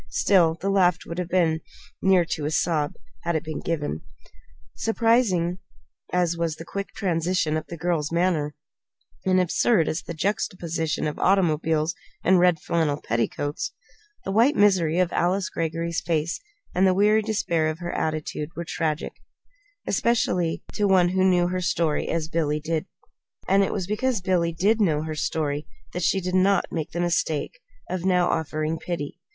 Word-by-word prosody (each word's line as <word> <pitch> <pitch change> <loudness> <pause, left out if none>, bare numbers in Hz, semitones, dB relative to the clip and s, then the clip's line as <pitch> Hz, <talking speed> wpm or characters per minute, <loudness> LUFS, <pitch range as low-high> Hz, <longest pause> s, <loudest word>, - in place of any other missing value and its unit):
Still, 170 -5 +3
the 195 - -1
laugh 180 -3 +4
would 170 +1 -5
have 180 -1 -3
been 165 -3 +2 0.4
near 190 -2 +4
to 155 -3 -3
a - - 0
sob, 150 0 0 0.3
had 170 -1 -1
it 160 - 0
been 155 -2 -5
given. 150 - -2 0.7
Surprising 225 -6 +1 0.5
as 175 -2 +1
was 165 -2 -1
the 165 - -9
quick 200 +3 -4
transition 170 -3 0
in 155 - -1
the 170 - -6
girl's 165 -2 -1
manner, 165 -4 +1 0.7
and 185 0 +4
absurd 180 0 +2
as 155 - -1
was - - -16
the 170 - -5
juxtaposition 170 -4 -1
of 150 - -3
automobiles 160 -4 +2 0.3
and 185 +1 +5
red 175 -2 +4
flannel 155 -4 0
petticoats, 145 - -2 0.5
the 195 - -2
white 230 +8 +4
misery 185 -6 +3
of 180 -1 +1
Alice 185 +2 +1
Greggory's 165 +1 -2
face 165 -1 -1 0.3
and 190 +2 +4
the 185 - +3
weary 210 +2 +4
despair 185 -7 0
of 155 0 -2
her 175 0 -5
attitude 155 -1 -2
were 170 - -4
tragic 160 -2 -2 0.7
specially 180 -8 +1
to 205 - +1
one 185 -2 +4
who 185 +1 +1
knew 180 -2 +3
her 185 0 -2
story 170 -4 0
as 165 -1 0
did - - -23
Billy 150 -2 +1
Neilson. 160 -1 -1 0.6
And 195 +1 +4
it - - -1
was 190 -3 -2
because 220 +4 0
Billy 180 -3 +1
did 200 +7 +2
know 155 -6 +2
her 160 0 -4
story 150 -1 -2 0.3
that 180 - -3
she 195 +3 +2
did 180 0 -3
not 190 +2 +3
make 160 -3 -3
the 170 - -5
mistake 175 - -1 0.3
now 180 0 +1
of - - +1
offering 155 0 -2
pity. 165 -5 -5
170 Hz, 170 wpm, -25 LUFS, 160-185 Hz, 0.7 s, and